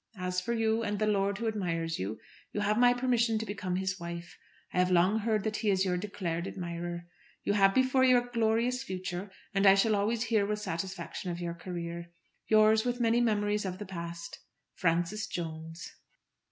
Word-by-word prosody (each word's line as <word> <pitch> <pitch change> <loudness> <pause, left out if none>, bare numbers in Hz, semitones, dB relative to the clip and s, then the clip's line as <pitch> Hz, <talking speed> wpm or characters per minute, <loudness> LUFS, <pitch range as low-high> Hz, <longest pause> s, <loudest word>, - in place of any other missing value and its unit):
As 180 0 -1
for 235 +5 -2
you, 225 0 +1
and 210 -2 -1
the 215 - +1
lord 200 -1 +1
who 230 - -2
admires 165 -6 -1
you, 105 +3 -3 0.3
you 205 - -1
have 210 +2 +2
my 245 0 +7
permission 245 -2 +2
to 220 - -3
become 200 -3 -3
his 190 0 -2
wife. 170 0 -7 0.4
I - - +1
have 180 0 +3
long 185 +4 +4
heard 215 -2 0
that 215 -1 -1
he 215 - 0
is 190 -1 +3
your 180 -1 +1
declared 180 -3 -3
admirer. 170 -1 -5 0.4
You - - +1
have 195 -1 +4
before 260 0 +4
you 255 -1 +6
a 245 0 0
glorious 235 +1 +1
future, 185 0 -5 0.2
and 195 0 +4
I 195 - +9
shall 215 +2 +3
always 220 +3 +1
hear 225 -3 +2
with 210 +1 -1
satisfaction 185 -1 -4
of 175 0 -4
your 170 -1 -3
career. 170 0 -6 0.4
Yours, 215 0 +5
with 245 0 -1
many 235 0 +3
memories 210 -2 +1
of 185 -2 -4
the 205 - -6
past, 170 -2 -7 0.3
FRANCIS 175 +5 0
JONES. 165 -1 -6
200 Hz, 195 wpm, -30 LUFS, 175-220 Hz, 0.4 s, I